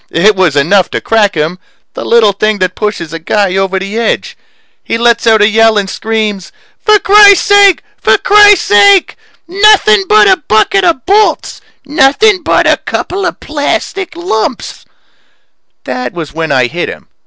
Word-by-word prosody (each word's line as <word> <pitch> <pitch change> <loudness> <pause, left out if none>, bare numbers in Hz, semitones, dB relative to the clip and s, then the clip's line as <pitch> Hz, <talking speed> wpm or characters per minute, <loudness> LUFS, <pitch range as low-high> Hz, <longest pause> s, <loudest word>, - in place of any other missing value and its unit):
It 200 +5 +1
was 185 -6 0
enough 175 +7 +1
to - - -4
crack 215 -4 0
him 160 +4 -3 0.3
the - - -7
little 230 -3 +2
thing 215 +2 -2
that 185 -1 -2
pushes 210 -7 -5
a 165 - -6
guy 190 +3 -2
over 195 0 -1
the 195 +4 -5
edge. 230 - -3 0.5
He - - -3
lets 235 0 0
out 220 -2 +3
a - - +4
yell 220 0 +2
and 200 -1 -1
screams, 215 -2 -4 0.3
"For 430 -2 +4
crisake! 405 -1 +4 0.2
For - - +2
crisake! 400 - +3 0.3
Nothing 405 +1 +2
but 425 -1 +4
a 380 -1 +3
bucket 300 - 0
of 330 -8 -1
bolts! 420 +2 -1 0.2
Nothing 315 +8 +1
but 320 - 0
a - - +2
couple 380 0 -4
of - - -7
plastic 315 +4 -4
lumps 250 -9 -5 0.5
" - - -51
That 250 - -6
was 165 -4 -8
when 160 0 -4
I 130 -1 +1
hit 170 +8 -5
him. - - -11
225 Hz, 165 wpm, -9 LUFS, -, 0.5 s, a